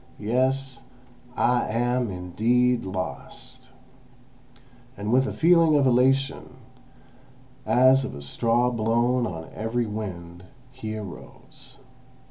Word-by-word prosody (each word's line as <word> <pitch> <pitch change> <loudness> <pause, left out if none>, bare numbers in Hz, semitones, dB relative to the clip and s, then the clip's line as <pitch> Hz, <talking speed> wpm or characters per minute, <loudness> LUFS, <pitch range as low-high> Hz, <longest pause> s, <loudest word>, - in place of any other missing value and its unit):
Yes, 130 +3 -1 0.5
I 125 -1 +1
am 120 +1 0
indeed 115 +7 0
lost!" 90 -7 -7 1.3
And 105 +3 -2
with 130 +1 +3
a - - -3
feeling 165 -2 +4
of 140 -2 +3
elation, 130 +2 +1 1.1
as 130 +2 +5
of - - -6
a 70 - -8
straw 120 - +1
blown 120 +2 +1
on 80 -4 -8
every 115 +2 -2
wind, 90 -5 -7 0.3
he 110 -4 -6
arose. 100 -5 -11
120 Hz, 100 wpm, -25 LUFS, 105-130 Hz, 1.3 s, as